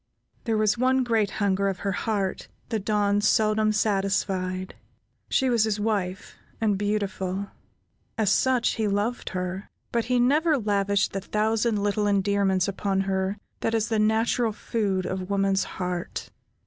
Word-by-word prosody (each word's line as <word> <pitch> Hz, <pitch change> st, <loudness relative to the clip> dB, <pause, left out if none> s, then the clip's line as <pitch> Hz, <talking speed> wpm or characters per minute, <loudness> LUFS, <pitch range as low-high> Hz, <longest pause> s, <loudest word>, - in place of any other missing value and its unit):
There 225 Hz, -3 st, +1 dB
was 215 Hz, +1 st, +2 dB
one 260 Hz, +1 st, +3 dB
great 225 Hz, -4 st, +1 dB
hunger 200 Hz, -1 st, 0 dB
of 195 Hz, -2 st, -1 dB
her 200 Hz, -, +1 dB
heart 200 Hz, -1 st, -2 dB, 0.2 s
the 225 Hz, -2 st, 0 dB
Don 205 Hz, 0 st, +1 dB
seldom 215 Hz, 0 st, +3 dB
satisfied. 195 Hz, -3 st, 0 dB, 0.6 s
She 265 Hz, -, +2 dB
was 235 Hz, -3 st, +3 dB
his 215 Hz, -1 st, -1 dB
wife, 200 Hz, -3 st, -2 dB, 0.2 s
and 215 Hz, -2 st, +2 dB
beautiful; 200 Hz, -1 st, -2 dB, 0.7 s
as 215 Hz, -3 st, +2 dB
such, 255 Hz, 0 st, +3 dB
he 220 Hz, -2 st, -1 dB
loved 205 Hz, +4 st, -1 dB
her; 185 Hz, +1 st, -4 dB, 0.2 s
but 235 Hz, -1 st, 0 dB
he 250 Hz, +1 st, +1 dB
never 300 Hz, +5 st, +3 dB
lavished 200 Hz, -3 st, +1 dB
the 195 Hz, -, -2 dB
thousand 215 Hz, +1 st, 0 dB
little 205 Hz, 0 st, +1 dB
endearments 200 Hz, -2 st, +2 dB
upon 195 Hz, 0 st, -1 dB
her 190 Hz, +1 st, -1 dB, 0.2 s
that 225 Hz, -, 0 dB
is 220 Hz, 0 st, 0 dB
the 220 Hz, -2 st, +1 dB
natural 220 Hz, +1 st, +2 dB
food 200 Hz, -4 st, -1 dB
of 185 Hz, 0 st, -4 dB
woman's 195 Hz, -1 st, +1 dB
heart. 180 Hz, -1 st, -4 dB
205 Hz, 150 wpm, -26 LUFS, 195-220 Hz, 0.7 s, one